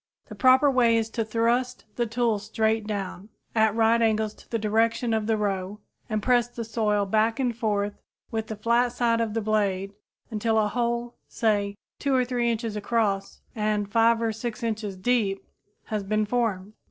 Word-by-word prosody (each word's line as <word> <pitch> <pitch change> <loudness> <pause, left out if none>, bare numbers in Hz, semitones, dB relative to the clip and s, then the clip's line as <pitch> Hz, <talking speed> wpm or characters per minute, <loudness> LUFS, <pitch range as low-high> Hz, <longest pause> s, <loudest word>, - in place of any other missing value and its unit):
The - - -7
proper 260 +2 +5
way 235 -3 +4
is 225 0 -1
to 230 - -1
thrust 235 +3 0
the 240 -1 0
tool 230 -1 0
straight 220 +1 0
down, 200 -1 -5 0.2
at 220 -1 +3
right 230 +1 +3
angles 220 -1 +1
to - - -20
the 230 - 0
direction 225 +2 +1
of 220 -1 0
the 225 -1 +2
row, 200 -1 -2 0.3
and 215 -1 -1
press 245 -1 +3
the 240 -1 -6
soil 215 -2 0
back 220 +4 +1
and 245 -3 0
forth 205 -2 -1 0.3
with 220 -1 -2
the 220 - -5
flat 235 +3 +1
side 235 -2 +1
of 225 -1 -2
the 225 - 0
blade 200 -2 0 0.4
until 220 +1 0
a 215 -1 +3
hole, 235 +1 -2
say 205 -3 0 0.2
2 280 -2 +1
or 255 -1 +3
3 240 -1 0
inches 225 -1 -2
across 210 -2 -1
and 210 -2 -1
5 230 +1 +3
or 225 -1 0
6 235 +2 -5
inches 215 -4 -3
deep, 200 -2 0 0.4
has 215 -2 -3
been 215 +2 0
formed. 210 -4 -1
220 Hz, 180 wpm, -26 LUFS, 210-235 Hz, 0.4 s, proper